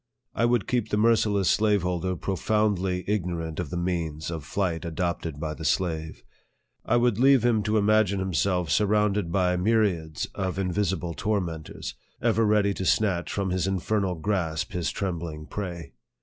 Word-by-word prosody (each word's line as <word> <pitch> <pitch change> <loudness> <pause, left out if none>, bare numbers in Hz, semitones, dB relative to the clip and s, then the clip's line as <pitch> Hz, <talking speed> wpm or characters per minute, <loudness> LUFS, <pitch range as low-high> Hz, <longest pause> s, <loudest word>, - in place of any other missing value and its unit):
I 115 - +1
would 120 -3 +2
keep 120 -3 0
the 105 - 0
merci 110 0 +4
less 100 -3 +1
slaveholder 95 -4 +1
profoundly 95 0 0
ignorant 85 -6 -2
of 90 -5 -3
the 90 - -4
means 85 -3 -2
of 80 -3 -5
flight 85 0 -2
adopted 85 -2 -3
by 80 0 -3
the 80 - -8
slave. 80 -2 -1 0.6
I 120 - +2
would 120 -3 +2
leave 135 -2 +5
him 115 -3 +3
to 105 +1 +1
im 100 - +2
agine 105 -2 +3
himself 90 -2 0
surrounded 105 0 +2
by 90 -1 +2
myriads 90 -7 +1
of 95 -1 -3
invisible 95 -2 -1
tor 105 +3 0
mentors, 80 -4 -6 0.3
ever 115 -1 +2
ready 105 -1 +3
to 95 - -4
snatch 95 -2 +1
from 100 -2 -1
his 95 0 0
infernal 95 0 0
grasp 80 -2 -1
his 90 -3 -1
trembling 85 -5 -4
prey. 85 -5 -6
95 Hz, 165 wpm, -26 LUFS, 85-105 Hz, 0.6 s, leave